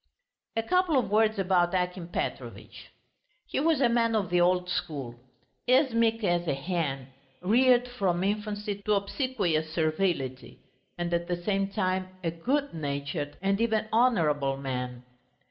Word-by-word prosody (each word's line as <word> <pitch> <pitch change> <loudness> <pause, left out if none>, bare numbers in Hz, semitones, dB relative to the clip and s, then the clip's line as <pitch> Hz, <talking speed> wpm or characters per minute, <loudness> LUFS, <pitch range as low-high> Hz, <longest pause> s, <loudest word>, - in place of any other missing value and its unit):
A 225 - 0
couple 360 +1 +2
of 245 - 0
words 220 0 +3
about 185 -2 +2
Akim 180 -1 -2
Petrovitch. 175 - -5 0.6
He - - -2
was 310 -1 +2
a 255 - +5
man 230 -1 +2
of 195 -5 -1
the 175 0 +3
old 180 0 +2
school, 135 -9 -4 0.5
as 260 0 +4
meek 230 -1 +2
as 175 -2 +1
a 140 - +1
hen, 140 -4 -3 0.3
reared 245 +4 +4
from 190 -8 -1
infancy 205 0 -2
to 210 - +4
obsequious 200 - -1
servility, 155 -5 -1 0.4
and 175 0 -2
at 170 0 0
the 175 -1 -2
same 195 0 +1
time 185 -2 -1 0.2
a 165 - 0
good 275 - -1
natured 145 -1 -4
and 195 +2 +1
even 220 -2 +1
honourable 155 - +2
man. 125 -2 -4
185 Hz, 145 wpm, -28 LUFS, 160-225 Hz, 0.6 s, a